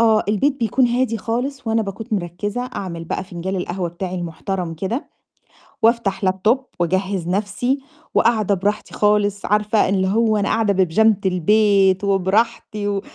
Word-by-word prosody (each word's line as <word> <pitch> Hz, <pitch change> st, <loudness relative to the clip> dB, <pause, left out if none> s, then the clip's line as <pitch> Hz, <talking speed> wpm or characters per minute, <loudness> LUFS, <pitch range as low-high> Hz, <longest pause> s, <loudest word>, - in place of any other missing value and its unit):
آه، 220 Hz, -2 st, +4 dB
البيت 270 Hz, +6 st, +1 dB
بيكون 240 Hz, +3 st, +2 dB
هادي 240 Hz, -1 st, 0 dB
خالص، 250 Hz, +5 st, -3 dB
وأنا 225 Hz, 0 st, +1 dB
باكون 200 Hz, +3 st, -6 dB
مرّكزة 205 Hz, +4 st, -3 dB
أعمل 170 Hz, -4 st, -5 dB
بقى 175 Hz, -, -3 dB
فنجال 185 Hz, +1 st, -4 dB
القهوة 180 Hz, 0 st, -3 dB
بتاعي 180 Hz, +2 st, -5 dB
المحترم 175 Hz, 0 st, -4 dB
كده، 195 Hz, -, -3 dB, 0.7 s
وأفتح 225 Hz, -4 st, +2 dB
Laptop 190 Hz, +7 st, +2 dB, 0.2 s
وأجهّز 185 Hz, +1 st, -1 dB
نَفْسي، 210 Hz, +8 st, -1 dB, 0.3 s
وقاعدة 215 Hz, -3 st, +3 dB
براحتي 205 Hz, +3 st, -2 dB
خالص 205 Hz, -1 st, +1 dB
عارفة 210 Hz, 0 st, +2 dB
اللي 190 Hz, -1 st, +1 dB
هو 220 Hz, +1 st, +2 dB
أنا 200 Hz, -, 0 dB
قاعدة 220 Hz, -3 st, +2 dB
ببيجامة 195 Hz, +3 st, +3 dB
البيت 195 Hz, +1 st, +3 dB
وبراحتي 205 Hz, +2 st, 0 dB
و 200 Hz, -1 st, -1 dB
205 Hz, 140 wpm, -20 LUFS, 190-225 Hz, 0.7 s, آه